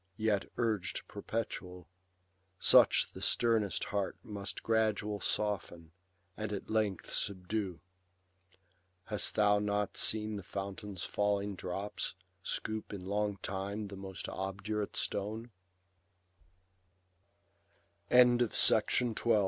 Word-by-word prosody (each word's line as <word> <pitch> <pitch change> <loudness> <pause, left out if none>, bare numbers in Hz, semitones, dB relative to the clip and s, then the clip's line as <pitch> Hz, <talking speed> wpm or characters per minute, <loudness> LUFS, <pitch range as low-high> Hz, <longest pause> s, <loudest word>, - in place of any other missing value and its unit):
Yet 110 -3 +1
urg'd 110 -5 -1
perpetual, 95 -5 -4 0.7
such - - +6
the - - -10
sternest 115 -4 +2
heart 100 -1 -2
Must 100 -1 -5
gradual 105 -2 +1
soften, 90 -5 -2 0.4
and 110 -1 -4
at 100 0 -5
length 105 -4 0
subdue. 95 -2 -1 1.2
Hast - - +1
thou 105 -1 +5
not 105 -1 0
seen 110 -1 +2
the - - -5
fountain's 100 0 -5
falling 105 0 0
drops 95 +3 -4 0.3
Scoop 110 +3 -3
in 95 -3 -6
long 105 +1 0
time 100 +2 -3
the 100 - -7
most 95 -1 -6
obdurate 100 +2 -3
stone 110 +4 -3
100 Hz, 90 wpm, -33 LUFS, 95-105 Hz, 1.2 s, such